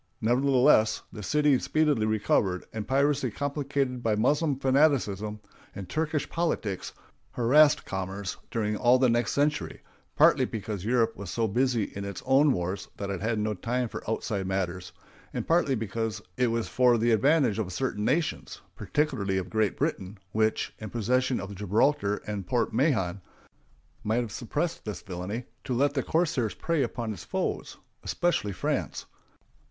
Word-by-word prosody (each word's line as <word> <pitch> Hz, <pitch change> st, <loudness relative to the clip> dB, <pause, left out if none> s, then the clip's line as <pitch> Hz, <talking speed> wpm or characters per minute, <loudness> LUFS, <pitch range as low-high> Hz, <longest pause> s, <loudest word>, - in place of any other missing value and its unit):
Nevertheless, 125 Hz, -1 st, +3 dB
the 105 Hz, -, -7 dB
city 150 Hz, +3 st, +3 dB
speedily 150 Hz, -8 st, +1 dB
recovered, 100 Hz, -3 st, +1 dB
and 110 Hz, -1 st, -4 dB
piracy, 140 Hz, 0 st, +2 dB
complicated 140 Hz, 0 st, -2 dB
by 110 Hz, -2 st, +1 dB
Moslem 145 Hz, +6 st, +1 dB
fanaticism 130 Hz, -7 st, +2 dB, 0.4 s
and 100 Hz, -3 st, -6 dB
Turkish 155 Hz, -, -1 dB
politics, 135 Hz, -, -2 dB, 0.4 s
harassed 145 Hz, +5 st, +4 dB
commerce 95 Hz, 0 st, -4 dB
during 110 Hz, -3 st, -1 dB
all 120 Hz, +3 st, +4 dB
the 130 Hz, -1 st, +3 dB
next 120 Hz, +1 st, +1 dB
century, 150 Hz, +1 st, -1 dB, 0.3 s
partly -, -, +5 dB
because 105 Hz, -3 st, -5 dB
Europe 115 Hz, 0 st, +1 dB
was 100 Hz, -2 st, -7 dB
so 115 Hz, +5 st, 0 dB
busy 120 Hz, +1 st, +1 dB
in 100 Hz, 0 st, -6 dB
its 100 Hz, 0 st, -6 dB
own 135 Hz, +3 st, +5 dB
wars 90 Hz, -2 st, -2 dB
that 100 Hz, -1 st, -4 dB
it 95 Hz, -2 st, -4 dB
had 110 Hz, +1 st, 0 dB
no 105 Hz, 0 st, 0 dB
time 120 Hz, +5 st, -2 dB
for -, -, -7 dB
outside 105 Hz, -3 st, -2 dB
matters, 90 Hz, -2 st, -2 dB, 0.4 s
and -, -, -3 dB
partly 165 Hz, -5 st, +3 dB
because 110 Hz, 0 st, -3 dB, 0.2 s
it 125 Hz, -, +2 dB
was 115 Hz, -1 st, -1 dB
for 125 Hz, -2 st, +4 dB
the 115 Hz, +1 st, +2 dB
advantage 125 Hz, 0 st, +3 dB
of 95 Hz, -4 st, -2 dB
certain 105 Hz, 0 st, -2 dB
nations 150 Hz, +8 st, -1 dB, 0.2 s
(particularly 130 Hz, -11 st, -1 dB
of 95 Hz, -1 st, -4 dB
Great 110 Hz, -1 st, +1 dB
Britain, 95 Hz, +2 st, -2 dB
which, 110 Hz, 0 st, 0 dB
in 110 Hz, -, -6 dB
possession 125 Hz, +3 st, 0 dB
of 100 Hz, +2 st, -6 dB
Gibraltar 105 Hz, +2 st, +1 dB
and 100 Hz, -4 st, -4 dB
Port 120 Hz, +3 st, 0 dB
Mahon, 100 Hz, -, +1 dB, 0.8 s
might 110 Hz, +3 st, +1 dB
have 115 Hz, -3 st, -5 dB
suppressed 145 Hz, +10 st, -3 dB
this 105 Hz, -4 st, -6 dB
villainy) 95 Hz, +6 st, -5 dB, 0.2 s
to 125 Hz, -, -2 dB
let 140 Hz, +3 st, +2 dB
the 135 Hz, -, 0 dB
corsairs 150 Hz, -, 0 dB
prey 165 Hz, -3 st, 0 dB
upon 115 Hz, -5 st, -2 dB
its 90 Hz, -, -9 dB
foes—especially 175 Hz, -12 st, -2 dB
France. -, -, -2 dB
115 Hz, 155 wpm, -28 LUFS, 100-135 Hz, 0.8 s, partly